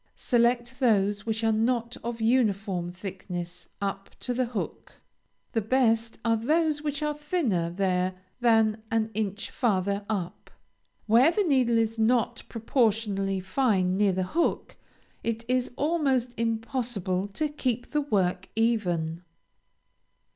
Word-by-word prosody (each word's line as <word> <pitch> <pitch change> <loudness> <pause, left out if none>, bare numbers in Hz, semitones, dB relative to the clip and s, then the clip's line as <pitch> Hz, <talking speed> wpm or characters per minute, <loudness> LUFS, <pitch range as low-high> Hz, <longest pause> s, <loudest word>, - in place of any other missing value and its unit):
Select 240 +1 +1
those 205 -4 +2
which 225 0 -1
are 225 - +3
not 235 +2 0
of 235 0 -4
uniform 205 -6 +1
thickness 180 -1 -7
up 195 0 -3
to 250 - -2
the 255 +1 +1
hook; 230 -3 -5 0.6
the 225 - 0
best 230 0 +2
are 230 0 +4
those 305 +5 +1
which 295 0 -2
are 300 0 0
thinner 295 - -1
there 185 0 0 0.2
than 225 -2 +3
an 220 -1 0
inch 205 -1 -3
farther 200 -3 0
up. 185 -5 -4 0.6
Where 235 +7 +6
the 410 +5 +1
needle 255 -8 +3
is 225 0 0
not 230 +1 +2
proportionally 215 -5 0
fine 190 -3 +1
near 205 0 +3
the 185 0 -1
hook, 330 - -1 0.5
it 230 0 -2
is 255 0 +1
almost 275 -5 +1
impossible 225 -4 -1
to 310 - 0
keep 255 -5 -2
the 300 - +1
work 190 -8 0
even. 175 -8 0
225 Hz, 130 wpm, -27 LUFS, 195-250 Hz, 0.6 s, Where